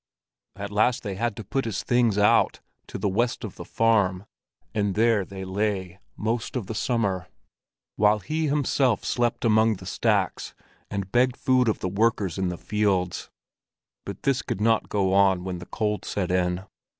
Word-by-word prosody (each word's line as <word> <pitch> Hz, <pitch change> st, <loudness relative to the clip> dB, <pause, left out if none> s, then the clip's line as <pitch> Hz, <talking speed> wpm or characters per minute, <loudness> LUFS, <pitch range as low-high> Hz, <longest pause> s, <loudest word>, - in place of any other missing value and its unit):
At 100 Hz, +1 st, -6 dB
last 120 Hz, +5 st, +2 dB
they 100 Hz, -3 st, -3 dB
had 115 Hz, +2 st, -2 dB
to 110 Hz, -, -7 dB
put 135 Hz, +6 st, -2 dB
his 105 Hz, -6 st, -3 dB
things 120 Hz, -4 st, +2 dB
out, 105 Hz, 0 st, +3 dB, 0.3 s
to -, -, -6 dB
the -, -, -1 dB
west 120 Hz, +5 st, 0 dB
of -, -, -5 dB
the -, -, -8 dB
farm; 100 Hz, -4 st, +1 dB, 0.5 s
and 100 Hz, -2 st, 0 dB
there 110 Hz, -2 st, +3 dB
they 95 Hz, 0 st, -8 dB
lay 95 Hz, -2 st, -2 dB, 0.2 s
most 115 Hz, +3 st, -2 dB
of 125 Hz, -6 st, -2 dB
the 100 Hz, -, -5 dB
summer, 105 Hz, -6 st, -1 dB, 0.7 s
while 105 Hz, +1 st, +4 dB
he 155 Hz, +8 st, -2 dB
himself 140 Hz, -4 st, +1 dB
slept 120 Hz, -1 st, 0 dB
among 110 Hz, 0 st, +4 dB
the -, -, -11 dB
stacks, -, -, 0 dB, 0.3 s
and 95 Hz, -1 st, -4 dB
begged 125 Hz, +1 st, +2 dB
food 130 Hz, -2 st, +3 dB
of 110 Hz, -, -2 dB
the -, -, -1 dB
workers 100 Hz, -2 st, 0 dB
in 95 Hz, -, 0 dB
the 90 Hz, -, -4 dB
fields. 100 Hz, -4 st, -1 dB, 0.7 s
But -, -, -8 dB
this 135 Hz, -2 st, +2 dB
could -, -, -4 dB
not 110 Hz, +1 st, +2 dB
go 95 Hz, -2 st, +1 dB
on 95 Hz, -2 st, +4 dB
when 90 Hz, -1 st, -4 dB
the 90 Hz, -, -10 dB
cold 105 Hz, -3 st, -2 dB
set 95 Hz, -3 st, -2 dB
in. 90 Hz, 0 st, 0 dB
105 Hz, 175 wpm, -25 LUFS, 95-115 Hz, 0.7 s, while